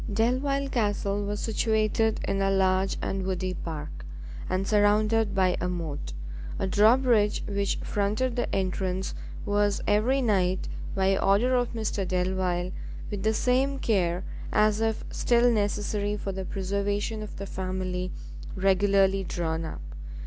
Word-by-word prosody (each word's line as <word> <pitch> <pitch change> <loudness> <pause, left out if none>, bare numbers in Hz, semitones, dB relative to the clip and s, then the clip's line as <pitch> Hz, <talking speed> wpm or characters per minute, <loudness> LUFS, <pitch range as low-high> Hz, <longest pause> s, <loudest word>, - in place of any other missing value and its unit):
Delvile 260 +6 +1
Castle 205 -4 0
was 205 0 -3
situated 220 0 +1
in 195 0 0
a 195 - +2
large 190 0 +2
and 195 0 -2
woody 185 0 -2
park, 155 -3 -6 0.5
and 185 +1 0
surrounded 210 +1 +3
by 185 -1 +3
a 180 - 0
moat. 165 -5 -4 0.4
A - - -1
drawbridge 215 +2 +4
which 200 -1 0
fronted 215 +5 0
the 245 - -1
entrance 185 0 -1 0.3
was 205 0 +1
every 225 +6 +3
night, 190 -6 +1 0.3
by 195 0 +3
order 210 +6 +3
of 245 -1 +1
Mr 215 -4 -2
Delvile, 180 -1 0 0.4
with 205 -2 -3
the 220 +2 +1
same 265 +4 +2
care 180 -7 +1 0.3
as 215 0 +3
if 225 -1 0
still 240 0 +3
necessary 205 -1 0
for 195 - -4
the 190 0 -5
preservation 200 +3 -2
of 215 - -7
the 200 - -5
family, 185 -1 -3 0.4
regularly 195 0 +3
drawn 165 -2 -2
up. 160 - -6
200 Hz, 135 wpm, -27 LUFS, 185-220 Hz, 0.5 s, drawbridge